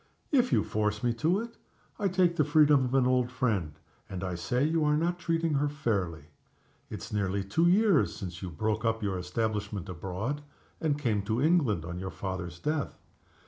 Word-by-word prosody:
"If 250 -4 +3
you 105 - +3
force 105 0 -1
me 120 -1 +2
to 175 +6 +3
it, 235 0 -9 0.4
I 205 - +2
take 180 -2 +2
the 150 - +3
freedom 145 -2 +5
of 125 +2 -1
an 130 -2 +4
old 125 -1 +2
friend, 110 -11 0 0.4
and 95 -1 -5
I 90 -1 -2
say 125 +9 0
you 160 0 +1
are 150 0 +3
not 175 +2 0
treating 165 -2 0
her 145 +1 +1
fairly. 100 - -2 0.7
It's - - -7
nearly 100 -1 0
two 130 - +2
years 195 -3 +4
since 90 -4 -7
you 95 - -4
broke 110 +7 -1
up 115 -1 0
your 95 -2 -1
establishment 105 +1 -2
abroad, 95 - -4 0.4
and 150 -3 0
came 115 -8 0
to 110 +3 0
England 140 - +2
on 85 +1 -5
your 95 +1 -4
father's 90 -1 -5
death. 150 - -2
115 Hz, 185 wpm, -29 LUFS, 95-150 Hz, 0.7 s, freedom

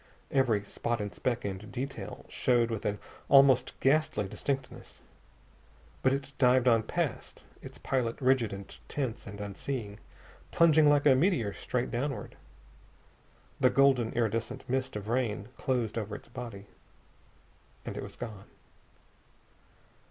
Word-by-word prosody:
Every 120 -7 +2
spot 115 +3 -2
and 105 -2 -4
speck 120 +5 -2
and 100 +1 -5
detail 135 +2 -6
showed 120 -2 +2
with 110 - -4
an 105 0 0 0.3
almost 135 -2 +5
ghastly 135 -7 +2
distinctness. 135 +5 -5 1.0
But 130 - +3
it 135 0 -3
dived 130 -1 +4
on 115 -2 +5
past, - - -3 0.2
its - - -10
pilot 125 -4 -1
rigid 130 -4 +2
and 100 0 -8
tense 130 -6 -3
and 100 0 -8
unseeing, 105 +1 -5 0.5
plunging 155 -2 +5
like 145 0 +3
a 140 - +7
meteor 130 - +2
straight 125 -1 -2
downward. 135 +3 -3 1.2
The - - +5
golden, 135 -4 +4
iridescent 115 +3 -2
mist 130 0 -1
of 105 0 -5
rain 120 -2 -1
closed 120 -5 -1
over 105 -1 -5
its - - -11
body. 115 -5 -8 1.2
And - - -5
it - - -4
was - - -8
gone. 105 -4 -8
120 Hz, 130 wpm, -30 LUFS, 105-135 Hz, 1.2 s, a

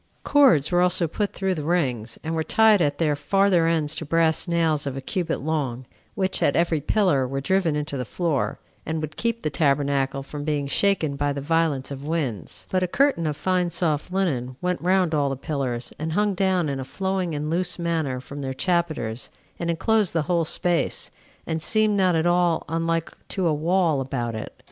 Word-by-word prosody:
Cords 250 - +4
were 175 0 +3
also 180 -1 +2
put 205 +6 -2
through 190 -1 -1
the 160 - -4
rings, 130 -9 -1
and 160 +1 -3
were 160 -1 0
tied 220 +1 +4
at 145 -2 +1
their 155 -3 +1
farther 180 +3 +2
ends 155 -2 +1
to 160 - -4
brass 160 +2 +1
nails 165 -4 +1
of 135 -1 -3
a - - -2
cubit 175 +6 -2
long, 135 -5 -2 0.3
which, 190 -3 -1
at - - +3
every 165 -2 +2
pillar, 155 -7 +2
were 135 +2 -3
driven 170 +1 +1
into 150 -1 -3
the 125 - -2
floor, 155 +1 -1 0.3
and 160 +1 -3
would 155 0 -5
keep 230 0 -2
the 155 - -1
tabernacle 140 -2 +1
from 145 +1 -7
being 145 -2 -1
shaken 155 0 +1
by 145 +1 0
the 140 - -3
violence 150 -2 0
of 140 0 -6
winds; 145 - -3
but 185 - +1
a 185 - +1
curtain 255 - +2
of 150 -1 -2
fine 180 -2 +1
soft 165 -1 -1
linen 135 -10 -1
went 180 0 -1
round 180 -1 +2
all 145 -2 +2
the 135 - -2
pillars, 130 -4 -3
and 155 +1 -3
hung 205 +2 +2
down 185 -3 +1
in 140 -2 -2
a - - -3
flowing 190 +2 -2
and 150 +1 -3
loose 180 +1 0
manner 160 -7 -1
from 140 +3 -8
their 130 -1 -4
chapiters, 160 - -1 0.3
and 170 - -2
enclosed 205 +4 +1
the 165 -2 +1
whole 170 +1 +1
space, 175 +1 -1 0.3
and 160 -1 -2
seemed 215 +3 +2
not 185 -3 +3
at 160 +1 +1
all 175 -1 +2
unlike 165 +1 -1
to 190 -2 -2
a 160 - +3
wall 165 -1 +1
about 120 -3 -3
it. 110 - -7
160 Hz, 200 wpm, -24 LUFS, 140-180 Hz, 0.3 s, Cords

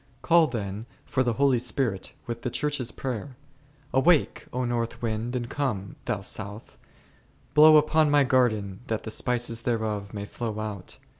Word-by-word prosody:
Call 170 -1 +5
then 105 -3 -5 0.2
for 130 - 0
the 120 -2 +1
Holy 135 0 +3
Spirit 115 -5 -1
with 120 0 -5
the 125 - -2
Church's 145 -3 -1
prayer, 130 0 -5 0.6
Awake, 155 +4 +3
O 125 0 -1
north 115 -1 -2
wind, 115 +2 -2
and 120 -1 -2
come, 115 -9 -3
thou 100 - -1
south; 105 +2 -6 0.7
blow 155 +1 +8
upon 155 0 +3
my 145 -1 +5
garden, 110 -7 +1
that 110 -3 -2
the 110 - -4
spices 120 0 0
thereof 110 -4 -2
may 100 -1 -5
flow 110 0 -5
out. 105 -4 -6
120 Hz, 155 wpm, -26 LUFS, 110-130 Hz, 0.7 s, blow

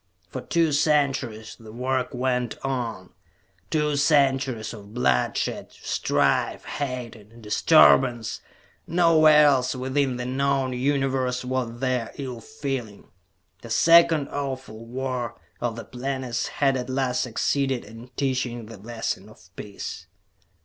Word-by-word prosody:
For 130 - -5
two 165 +1 +1
centuries 135 -7 0
the 110 -2 -12
work 125 +2 -1
went 125 -2 -1
on. 120 -8 -3 0.6
Two 150 -1 +1
centuries 135 -6 +2
of 105 0 -12
bloodshed, 125 - 0
strife, - - 0
hate 125 -4 -4
and 110 +2 -16
disturbance. 120 0 +4 0.5
No 165 -1 +4
where 155 -1 +7
else 130 -3 +3
within 130 0 0
the 125 - -4
known 135 0 0
Universe 130 -1 0
was 125 -2 -3
there 125 -3 -1
ill 125 -4 -6
feeling. 135 - -6 0.5
The 115 - -10
second 165 +3 +5
awful 130 -5 -5
War 125 -2 -4 0.2
of 120 -2 -2
the 115 - -7
Planets 130 -1 -3
had 135 -2 +1
at 125 0 -5
last 130 -1 0
succeeded 130 +1 0
in 115 +3 -11
teaching 130 -4 -2
the 110 0 -11
lesson 110 -1 -4
of 90 -4 -19
peace. 100 -3 -7
130 Hz, 125 wpm, -25 LUFS, 115-135 Hz, 0.6 s, where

